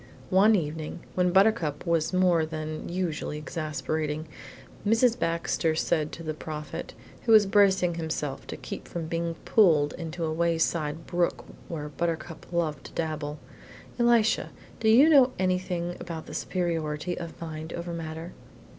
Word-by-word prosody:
One 205 +4 +6
evening, 160 -1 -3
when 180 0 +2
Buttercup 180 -7 +3
was 165 -2 +1
more 180 -3 +3
than 155 0 -5
usually 170 -4 -2
exasperating, 155 0 -3 0.6
Mrs. 225 +3 +4
Baxter 165 -1 0
said 155 -1 0
to 165 - -7
the 155 -1 -3
Prophet, 150 0 -6 0.3
who - - +4
was 215 -2 +8
bracing 195 -3 +4
himself 160 -4 -4
to - - -6
keep - - -7
from 170 -2 -4
being 165 +1 -2
pulled 155 -9 +4
into 165 0 -4
a 155 - -1
wayside 165 -1 0
brook 175 0 0 0.2
where 150 -3 -4
Buttercup 165 +3 -4
loved 160 -5 -1
to - - -10
dabble, 155 -2 -3 0.6
"Elisha, 235 -2 +3 0.3
do 220 -1 +2
you 250 +7 +7
know 270 -5 +6
anything 180 -2 -1
about 165 -2 -6
the - - -9
superiority 165 -2 -2
of 170 -1 -7
mind 160 -1 -6
over 170 0 -5
matter?" 165 +1 -6
165 Hz, 145 wpm, -27 LUFS, 155-180 Hz, 0.6 s, was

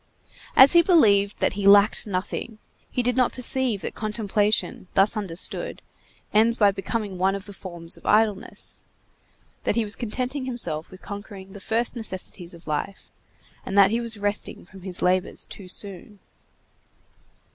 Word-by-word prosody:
As 265 +1 +9
he 345 - +7
believed 210 - +3
that - - +2
he 200 0 -1
lacked 205 +2 +5
nothing, 205 +3 -4 0.3
he 250 - -1
did 250 +1 +1
not 255 -2 +2
perceive 250 -4 +4
that - - -5
contemplation, 215 0 -1
thus 195 +3 +4
understood, 190 -5 -4 0.5
ends 225 +2 +4
by 205 -2 +5
becoming 195 0 -4
one 190 +1 +2
of 200 0 -7
the 205 - -10
forms 175 -3 -5
of - - -19
idleness; 210 -1 0 0.8
that - - 0
he 230 - +2
was 205 -1 0
contenting 255 +4 -4
himself 175 -12 -3
with 185 - -14
conquering 200 -1 -9
the 200 - -9
first 225 +5 -1
necessities 185 -5 -5
of 170 - -17
life, 155 +6 -4 0.5
and 195 - -4
that 200 0 +7
he 230 +1 0
was 230 -2 -4
resting 205 -2 -2
from 190 +1 -14
his 180 -1 -2
labors 185 +1 +1
too 195 - -10
soon. 200 +2 -6
205 Hz, 155 wpm, -24 LUFS, 190-230 Hz, 0.8 s, As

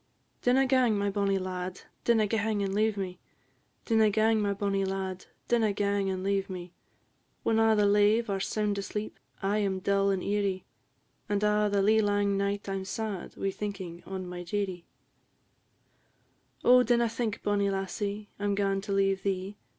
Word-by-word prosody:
"Dinna 260 +2 +4
gang, 255 -5 +3
my 200 0 0
bonnie 200 -1 +1
lad, 185 -1 -4 0.2
dinna 225 -2 +4
gang 215 -1 0
and 195 -1 -2
leave 215 0 +1
me; 185 -2 -4 0.7
Dinna 220 -2 +4
gang, 220 +1 +2
my 205 -1 +1
bonnie 200 0 0
lad, 190 -1 -3 0.2
dinna 225 -3 +2
gang 200 -1 0
and 185 -1 -3
leave 195 0 0
me; 180 -1 -7 0.7
When 225 -1 +2
a' 225 0 +4
the 210 -1 +3
lave 210 +3 +4
are 195 -1 -1
sound 205 0 -1
asleep, 210 +2 -5 0.2
I 205 +2 +1
'm 195 -2 0
dull 200 +1 +1
and 190 -2 0
eerie; 200 -2 -1 0.6
And 205 0 0
a' 210 0 +3
the 200 -1 +2
lee 220 +2 +4
lang 205 -1 +1
night 200 +1 -1
I 195 - -2
'm 190 - -5
sad, 210 -1 -4
wi' 195 - -1
thinking 190 -4 -6
on 190 -1 -5
my 180 0 -6
dearie." 185 -1 -3 1.8
"Oh, 250 +1 +8
dinna 235 -1 +3
think, 230 -1 -3
bonnie 200 -1 +1
lassie, 200 +2 -3
I 205 - -2
'm 200 -1 +1
gaun 195 -1 0
to 200 +1 -6
leave 195 -1 +2
thee! 195 0 -2
200 Hz, 175 wpm, -29 LUFS, 195-210 Hz, 1.8 s, Oh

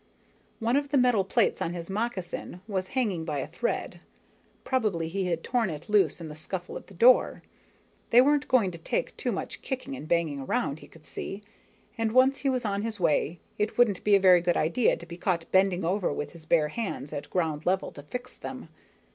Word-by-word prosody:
One 230 +2 +1
of 285 0 -1
the 285 - +2
metal 245 -6 +4
plates 190 - +1
on 170 - -1
his 170 -1 -6
moccasin 195 -4 -4
was 190 -3 -2
hanging 200 -10 0
by 155 -3 -3
a 135 - -2
thread, 180 +9 -3 0.6
probably 210 -11 0
he 190 +2 -2
had 170 -2 -1
torn 235 -4 +1
it 155 +4 -7
loose 195 -8 +3
in 165 - -7
the 150 - -7
scuffle 175 +3 -6
at - - -8
the 195 - -15
door. 245 +8 +5 0.7
They 235 - +7
weren't 290 +3 +4
going 230 -8 +3
to 170 - -9
take - - -2
too - - -2
much - - -5
kicking 270 +1 -4
and 155 - -8
banging 165 -4 +1
around, 140 +2 -1
he - - -13
could 160 -1 -18
see, 200 +2 -6 0.6
and 225 -1 0
once 260 +2 +5
he 275 - 0
was 255 -3 -1
on 200 -1 -1
his 220 -1 -4
way, 165 0 +1 0.2
it 210 +1 -1
wouldn't 220 -6 +3
be 210 -1 +5
a - - +5
very 185 -2 +6
good 175 0 +1
idea 215 +10 +2
to 170 - -11
be 170 0 -9
caught 175 -2 -1
bending 190 -2 +3
over 185 +2 0
with 145 0 -4
his 165 -2 -14
bare 155 -3 +3
hands 155 - -4
at 145 - -5
ground 160 -4 -1
level 190 +1 +1
to 145 - -10
fix 250 - -7
them. - - -7
190 Hz, 215 wpm, -28 LUFS, 165-235 Hz, 0.7 s, They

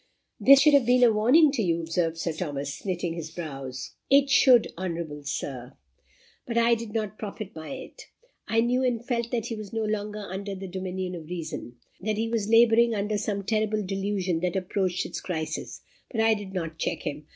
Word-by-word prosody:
"This 275 +1 +8
should 300 0 +6
have 275 -5 +5
been 250 0 +5
a 235 -2 +6
warning 265 +9 +5
to 270 -5 -1
you," 170 -4 +1
observed 165 0 -1
Sir 165 0 -1
Thomas, 145 -4 -4
knitting 180 -3 -2
his 165 -2 -6
brows. 135 -6 -6 0.2
"It 275 0 +5
should, 250 -3 +6
honourable 165 -4 -4
Sir. 130 -3 -4 0.7
But 235 -1 -2
I 235 0 +5
did 230 -2 -3
not 215 -1 -3
profit 210 -1 -6
by 160 0 -8
it. 265 0 -10 0.4
I 225 0 +3
knew 245 +2 +1
and 240 -2 0
felt 235 -3 -1
that 235 -3 -2
he 230 - -4
was 215 -2 -8
no 225 -1 -1
longer 210 -1 -3
under 195 +1 -5
the 190 0 -7
dominion 185 0 -4
of 165 -3 -8
reason 160 -8 -6 0.2
that 215 +2 -2
he 225 +1 0
was 220 -3 -1
labouring 230 0 +5
under 205 +1 -1
some 200 -1 -2
terrible 215 0 0
delusion 195 -2 -1
that 180 +1 -1
approached 185 -1 -1
its - - -5
crisis; 160 -4 -4 0.3
but 225 - -3
I 225 0 +5
did 205 -3 -5
not 165 -4 -4
check - - -2
him. 150 +1 -5
200 Hz, 195 wpm, -26 LUFS, 170-230 Hz, 0.7 s, This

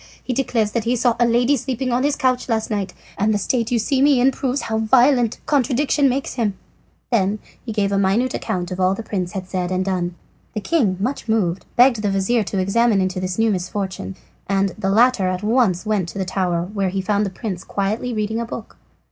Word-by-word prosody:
He 255 - -2
declares 235 -5 0
that 235 -1 -2
he 240 +2 +2
saw 240 -1 +2
a 240 - +4
lady 240 +4 +3
sleeping 260 0 -2
on 245 +1 +1
his 285 +1 +1
couch 255 -3 0
last 220 -1 -1
night, 200 -2 -2 0.3
and 210 +2 +2
the 210 - +2
state 230 +3 -1
you 245 - +1
see 260 +4 +1
me 280 -2 +5
in 260 +2 +4
proves 265 +1 -2
how 220 0 -2
violent 245 +1 +3
contradiction 275 +1 +2
makes 270 +2 -2
him." 215 -5 -1 0.5
He 235 - +4
then 200 +2 0 0.3
gave 205 -2 0
a 200 - +2
minute 205 +7 +1
account 175 -1 -3
of 180 - -4
all 185 +1 +3
the 230 - -6
prince 185 -4 -3
had 190 -2 -5
said 180 -2 -2
and 185 0 0
done. 180 -2 -2 0.4
The - - 0
king, 215 - +1
much 240 +4 -3
moved, 190 -5 0
begged 245 -2 +5
the 205 - 0
vizir 195 +5 +1
to 195 - -3
examine 205 +3 +2
into 185 -1 -1
this 185 0 -3
new 225 0 +3
misfortune, 190 0 -3 0.3
and 195 0 +1
the 195 0 -3
latter 225 -1 +4
at 185 +1 -2
once 215 -5 +2
went 205 -5 0
to - - -8
the 190 - -1
tower, 180 -2 -1
where 195 -3 0
he 195 +1 -2
found 205 +2 +1
the 200 - -1
prince 185 -2 -5
quietly 210 +5 -2
reading 220 0 -2
a 235 - -2
book. 230 -1 -8
215 Hz, 225 wpm, -21 LUFS, 190-245 Hz, 0.5 s, me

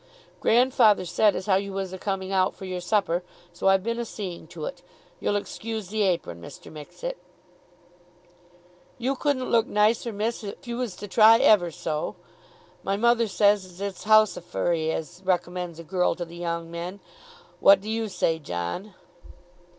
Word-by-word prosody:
"Grandfather 235 -5 +4
said 205 +3 +3
as - - -4
how 195 -3 +4
you 200 0 -3
was 190 -1 -4
a - - -5
coming 195 -1 -3
out 185 -1 +2
for 190 - -9
your 185 -1 -4
supper, 180 -2 +1 0.3
so 175 - -2
I've 195 -1 +4
been 230 +2 -2
a - - -1
seeing 185 -7 -7
to 160 -1 -7
it. 275 - -6 0.4
You'll 205 - 0
excuse 215 0 -4
the 215 +1 -1
apron, 170 - 0
Mr. - - -11
Mixet." - - -7 1.8
"You 260 +3 -1
couldn't 265 -2 -1
look 230 -2 +3
nicer, 220 +3 +2
miss, 220 +3 -2
if 205 +7 -8
you 235 0 -3
was 245 -7 -3
to 205 - -8
try 220 +2 +7
it 255 - 0
ever 205 -10 +5
so. 155 -1 -3 0.7
My 195 +1 -1
mother 235 +1 +3
says 205 -1 +3
as 180 -1 -14
it's 200 0 -5
housifery 175 -6 +2
as 160 +3 -5
recommends 180 -2 -1
a 165 - -8
girl 180 +2 0
to 175 - -4
the 170 +1 -12
young 170 -1 -4
men. 175 +4 -6 0.6
What 195 0 +7
do 200 - -11
you 225 0 -1
say, 170 -4 0
John?" 145 - -5
195 Hz, 175 wpm, -26 LUFS, 175-220 Hz, 1.8 s, try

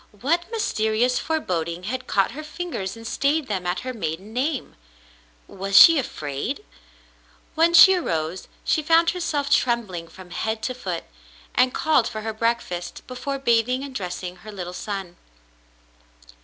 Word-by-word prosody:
What 335 +6 +1
mysterious 245 - +1
foreboding 175 - -2
had 255 +6 -4
caught 195 +1 +2
her 285 +6 -7
fingers 305 - -5
and 230 - -11
stayed 285 +5 +1
them 190 -4 -2
at 180 +1 -1
her 255 0 -5
maiden 195 0 -5
name? 265 +2 -2 0.7
Was 195 0 0
she 330 - +10
afraid? 155 - -4 0.9
TNTien 335 +2 +4
she 380 +3 +10
arose, 170 - -2 0.2
she 315 - +2
found 330 +2 +4
herself 305 -5 -2
trembling 210 -9 +1
from 180 +1 -14
head 220 +4 -3
to 255 - -1
foot, 185 -9 -4 0.5
and 255 - +3
called 310 -6 +2
for 215 - -5
her 220 0 -3
breakfast, 215 -6 -2
before 255 +2 -4
bathing 250 0 +2
and 280 -1 -7
dressing 180 -3 -5
her 215 +4 -11
little 180 -3 -6
son. 190 -3 -5
230 Hz, 145 wpm, -23 LUFS, 185-280 Hz, 0.9 s, she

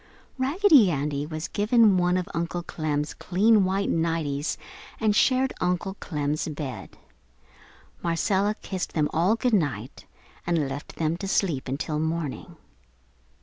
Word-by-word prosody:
Raggedy 285 - +5
Andy 145 -1 -2
was 155 0 -4
given 215 0 +4
one 180 0 +2
of 180 - -2
Uncle 170 +1 -2
Clem's 150 -3 -2
clean 205 +2 +3
white 195 +2 0
nighties 160 -3 -1 0.4
and 215 -2 +2
shared 260 +3 +3
Uncle 180 +2 0
Clem's 150 -2 -2
bed. 145 -4 -6 1.0
Marcella 195 +5 +1
kissed 190 -2 -4
them 150 -2 0
all 175 +7 +3
good 245 +1 0
night 135 - -1 0.4
and 165 -5 +1
left 135 +2 -7
them 160 +1 -1
to 195 - -5
sleep 170 -9 0
until 150 +3 -2
morning. 160 -2 -3
170 Hz, 130 wpm, -26 LUFS, 150-200 Hz, 1.0 s, Raggedy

